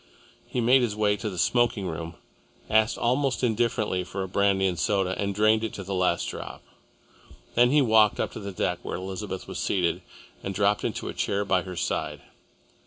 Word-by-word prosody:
He 125 - -2
made 125 +3 +5
his 115 -4 0
way 105 -1 +2
to 105 +2 -3
the 95 - -7
smoking 110 +3 +2
room, 85 0 -5 0.6
asked 110 +1 +3
almost 130 +2 0
indifferently 110 -5 +1
for 95 +1 -5
a - - -4
brandy 95 0 +2
and 90 -3 0
soda, 95 0 +1
and 100 -1 -2
drained 110 +1 +3
it 110 - -3
to 95 - -6
the 100 +1 -5
last 90 -2 +1
drop. - - -7 0.9
Then 120 +1 +5
he 145 +1 +4
walked 110 -3 +4
up - - -1
the 100 -2 -6
deck 90 - -2
to - - -12
where - - -3
Elizabeth 95 +1 -5
was - - -5
seated, 90 -4 0 0.4
and 95 0 -5
dropped 105 +1 +2
into - - -3
a - - -4
chair 100 +1 -1
by 95 -2 +2
her 90 +1 -7
side. - - -2
100 Hz, 195 wpm, -26 LUFS, 95-110 Hz, 0.9 s, made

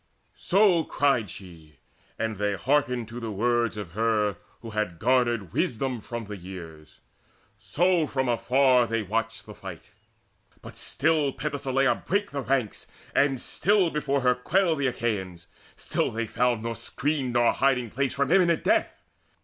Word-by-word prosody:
So 190 -3 +4
cried 135 -10 +1
she, 80 -5 -12 0.4
and 110 -2 -2
they 105 0 0
hearkened 125 -1 0
to 120 +2 -7
the 115 -2 -5
words 115 +2 0
Of 100 -6 -6
her 105 -1 +1 0.3
who 115 - -7
had 105 -5 -2
garnered 120 -5 +1
wisdom 125 +1 -1
from 120 +1 -6
the 105 +1 -7
years; 85 -4 -11 0.6
So 175 -1 +1
from 130 -2 -1
afar 125 +1 +3
they 115 -1 -1
watched 115 +3 -3
the 105 - -10
fight. 90 -7 -9 0.8
But - - -10
still 150 -1 +1
Penthesileia 135 -2 0
brake 205 +2 -1
the 140 - -3
ranks, 130 -5 -1 0.3
and 135 -1 +2
still 195 - +1
Before 140 -2 0
her 125 0 +4
quailed 165 +5 +1
the 140 - +1
Achaeans: 95 -8 -3 0.3
still - - -1
they 115 +1 -3
found 120 0 0
Nor 115 0 -2
screen 130 +3 -2
nor 120 -1 +3
hiding 125 -4 +1
place 135 0 -1
from 140 -1 0
imminent 175 -4 +3
death. - - +1
120 Hz, 150 wpm, -26 LUFS, 110-140 Hz, 0.8 s, So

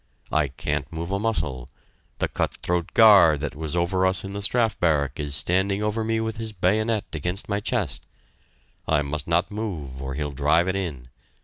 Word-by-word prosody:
I 75 -2 +2
can't 70 +1 -3
move 85 +2 -5
a 100 - 0
muscle; 75 - -2 0.5
the - - 0
cut - - -2
throat 90 -1 -1
guard 100 -10 +7
that 75 -4 -3
was 80 +1 -4
over 90 +2 +2
us 95 0 0
in 95 0 -6
the 100 - -4
Strafe 110 -2 +1
Barrack 75 -4 +1
is 75 -1 -2
standing 95 +5 +1
over 105 +1 0
me 115 0 0
with 110 -1 -3
his 110 -1 -4
bayonet 105 +4 +1
against 90 +5 -3
my 100 -1 0
chest - - -2 0.8
I 75 -2 +2
must 75 +2 -4
not 85 +3 +1
move 80 -12 -5
or 65 0 -4
he'll 75 0 -3
drive 75 +6 +2
it 95 - 0
in.... 75 -11 -4
90 Hz, 190 wpm, -24 LUFS, 75-100 Hz, 0.8 s, guard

